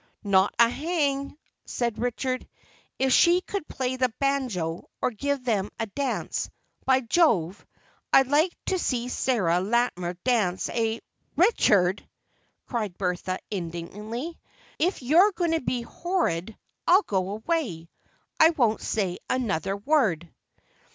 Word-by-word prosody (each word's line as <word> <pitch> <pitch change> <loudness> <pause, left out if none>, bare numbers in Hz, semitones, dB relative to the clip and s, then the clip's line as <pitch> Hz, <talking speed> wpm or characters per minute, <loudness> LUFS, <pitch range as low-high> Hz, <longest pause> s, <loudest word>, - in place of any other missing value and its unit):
"Not 195 -1 +3
a 235 - +7
hang!" 280 0 -1 0.3
said 235 -3 -2
Richard. 255 +2 -2 0.5
"If 265 -1 +2
she 350 +1 +5
could 390 -3 -5
play 260 0 -2
the 255 -1 +1
banjo, 245 -13 -1
or - - 0
give 280 +4 -2
them 210 -5 0
a 225 - 0
dance—by 260 +2 -2
Jove, 225 - +2 0.5
I'd 270 - +6
like 300 +7 +3
to 375 - 0
see 250 -6 -1
Sarah 195 -10 +1
Latimer 190 -4 0
dance 210 -8 +1
a—" 225 -1 -1 0.3
"Richard!" 205 - +3 0.6
cried 215 -7 -3
Bertha, 185 0 -2
indignantly. 210 - -5 0.4
"If 340 -3 0
you're 345 +11 +5
going 345 -2 0
to 325 - +1
be 245 -1 -2
horrid 225 - -2 0.3
I'll 375 +4 +6
go 190 -2 -1
away, 220 - -2 0.5
I 320 - +8
won't 240 -9 +1
say 190 -5 -1
another 195 -6 -1
word." 205 - +1
240 Hz, 125 wpm, -26 LUFS, 195-285 Hz, 0.6 s, I